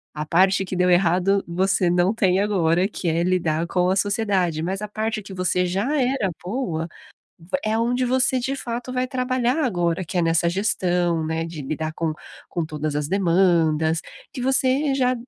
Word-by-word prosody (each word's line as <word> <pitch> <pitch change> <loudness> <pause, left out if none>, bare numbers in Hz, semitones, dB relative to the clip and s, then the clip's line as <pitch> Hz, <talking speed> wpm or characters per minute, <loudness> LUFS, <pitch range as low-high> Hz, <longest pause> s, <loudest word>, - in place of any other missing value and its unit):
a 150 0 -3
parte 190 +4 +3
que 185 - -5
deu 180 0 +2
errado, 180 +2 +3
você 185 +1 +1
não 175 +2 +3
tem 190 -4 +2
agora, 185 -3 +2
que 200 - -5
é 165 +1 +1
lidar 170 -3 0
com 180 0 +1
a 190 - +2
sociedade, 195 -5 0
mas 190 +4 -3
a 210 - -3
parte 215 +1 -3
que 195 -1 -12
você 180 0 0
já 200 +11 -1
era 250 -7 0
boa, 180 -6 -3 0.5
va 175 +11 -3
é 220 +1 0
onde 245 +2 +1
você 260 0 +2
de 270 +3 -2
fato 245 0 -5
vai 255 0 0
trabalhar 255 +2 0
agora, 175 -6 0
que 185 - -6
é - - +3
nessa 165 +1 +2
gestão, 175 -3 0
né, 160 +1 -2
de 165 -2 -7
lidar 155 +3 -3
com 160 -1 -2 0.3
com 170 - -2
todas 155 -1 -3
as 150 -1 -2
demandas, 165 -4 +2 0.3
que 255 - -6
você 265 +2 +2
já 255 -1 +2
185 Hz, 185 wpm, -23 LUFS, 170-225 Hz, 0.5 s, parte